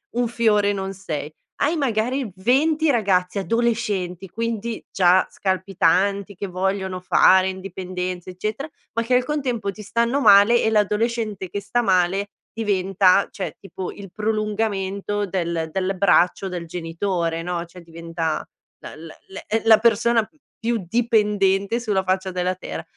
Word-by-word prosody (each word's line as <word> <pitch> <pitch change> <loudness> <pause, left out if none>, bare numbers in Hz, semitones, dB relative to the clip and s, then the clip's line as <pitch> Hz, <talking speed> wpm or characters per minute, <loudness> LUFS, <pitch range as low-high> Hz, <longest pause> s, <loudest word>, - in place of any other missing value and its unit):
un 245 0 +1
fiore 210 -3 +2
non 195 -1 -4
sei. 155 -6 -5 0.3
Hai 305 +4 +2
magari 250 - -1
20 300 +9 +2
ragazzi 195 -6 +1
adolescenti, 205 -5 -1
quindi 230 +1 -3
già 185 0 +4
scalpitanti, 195 +1 0
che 200 +1 -5
vogliono 190 0 -2
fare 185 +1 +5
indipendenze, 185 -1 -5
eccetera, 215 +10 -4 0.3
ma 230 - 0
che 240 +2 -1
al 250 0 +2
contempo 255 -8 -2
ti 210 - -11
stanno 235 +6 0
male 210 +1 +6
e - - +3
l'adolescente 210 -1 0
che 200 - -3
sta 210 +4 -1
male 190 0 +1 0.2
diventa 195 -3 +2
cioè, 190 - -6
tipo 190 -1 -7
il 200 -2 -11
prolungamento 205 -1 -2
del 170 -3 -2
del 190 +2 -1
braccio 195 0 +3
del 180 -2 -5
genitore, 165 0 -2
no, 175 -1 -3
cioè 175 +1 -14
diventa 165 -1 -4 0.4
la - - -10
la 160 +1 -11
la, 190 - -9
ehm, 225 +1 0
la 225 -1 +8
persona 230 0 +3 0.3
più 230 -3 -2
dipendente 210 -2 +1
sulla 205 -5 0
faccia 190 0 -1
della 180 0 -1
terra. 185 - -7
200 Hz, 140 wpm, -22 LUFS, 185-225 Hz, 0.4 s, la